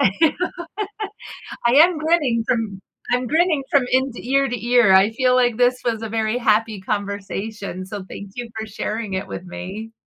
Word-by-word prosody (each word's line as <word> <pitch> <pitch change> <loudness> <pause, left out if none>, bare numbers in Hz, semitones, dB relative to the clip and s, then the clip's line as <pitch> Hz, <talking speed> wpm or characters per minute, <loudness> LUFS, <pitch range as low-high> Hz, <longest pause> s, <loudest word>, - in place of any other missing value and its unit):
I 195 - +5 1.6
am 325 +2 +6
grinning 300 -8 +1
from 220 -5 -1 0.3
I'm 250 0 +1
grinning 320 0 +2
from 280 -3 +4
in 260 0 +2
ear 275 +3 +1
to 235 -1 -4
ear. 240 -5 +5
I 195 +3 +6
feel 250 +2 +2
like 245 -3 +3
this 250 0 +3
was 225 -2 -1
a 225 - -3
very 220 +2 0
happy 220 -2 +1
conversation, 200 -1 -4
so 195 0 -7
thank 200 -1 -8
you 245 -1 -5
for 220 - -4
sharing 215 0 -4
it 190 - -3
with 180 - -7
me. 190 +5 -7
225 Hz, 165 wpm, -21 LUFS, 205-250 Hz, 1.6 s, am